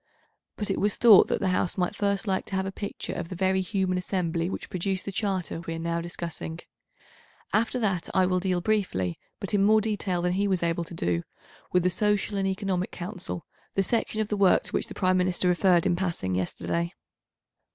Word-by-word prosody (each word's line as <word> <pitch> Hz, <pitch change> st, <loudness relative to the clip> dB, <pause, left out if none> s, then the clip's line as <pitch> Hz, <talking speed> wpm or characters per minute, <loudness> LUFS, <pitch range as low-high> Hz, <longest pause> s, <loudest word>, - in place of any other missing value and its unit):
But 210 Hz, -2 st, -3 dB
it -, -, -1 dB
was 205 Hz, 0 st, +1 dB
thought 225 Hz, -5 st, +8 dB
that -, -, 0 dB
the 190 Hz, -, +1 dB
House 185 Hz, 0 st, 0 dB
might 180 Hz, -1 st, 0 dB
first 200 Hz, 0 st, 0 dB
like 190 Hz, -2 st, -1 dB
to 195 Hz, -, -4 dB
have 190 Hz, 0 st, 0 dB
a 195 Hz, -, -3 dB
picture 200 Hz, +1 st, -5 dB
of 165 Hz, -, -5 dB
the 185 Hz, -, -5 dB
very 190 Hz, +1 st, +2 dB
human 185 Hz, -2 st, 0 dB
assembly 175 Hz, -2 st, -1 dB
which -, -, -5 dB
produced 185 Hz, +1 st, -2 dB
the 200 Hz, -, -3 dB
Charter 190 Hz, -4 st, -2 dB
we 165 Hz, -, -2 dB
are -, -, -4 dB
now 170 Hz, 0 st, -1 dB
discussing. 170 Hz, -1 st, -5 dB, 0.9 s
After 230 Hz, +3 st, +2 dB
that 195 Hz, -7 st, -1 dB
I 185 Hz, -, +3 dB
will 185 Hz, 0 st, +1 dB
deal 180 Hz, -1 st, 0 dB
briefly, 175 Hz, -, 0 dB, 0.2 s
but 195 Hz, -, -5 dB
in 200 Hz, -1 st, +4 dB
more 215 Hz, +2 st, +6 dB
detail 200 Hz, -5 st, -1 dB
than 180 Hz, 0 st, +1 dB
he 200 Hz, +2 st, +1 dB
was 185 Hz, -3 st, 0 dB
able 170 Hz, 0 st, 0 dB
to 170 Hz, -, -9 dB
do, 85 Hz, -, 0 dB, 0.5 s
with 180 Hz, -1 st, +3 dB
the 180 Hz, -, +3 dB
Social 205 Hz, +1 st, +1 dB
and 195 Hz, -, +1 dB
Economic 190 Hz, -1 st, -1 dB
Council, 180 Hz, -1 st, -5 dB, 0.3 s
the 195 Hz, -, +3 dB
section 220 Hz, +1 st, 0 dB
of 215 Hz, -, -2 dB
the 210 Hz, -, 0 dB
work 195 Hz, -2 st, +5 dB
to -, -, -5 dB
which -, -, -1 dB
the -, -, -9 dB
Prime 185 Hz, -1 st, +2 dB
Minister 180 Hz, 0 st, +1 dB
referred 180 Hz, -1 st, +4 dB
in 175 Hz, -, +3 dB
passing 170 Hz, -, -2 dB
yesterday. 170 Hz, -, -1 dB
185 Hz, 215 wpm, -27 LUFS, 175-200 Hz, 0.9 s, thought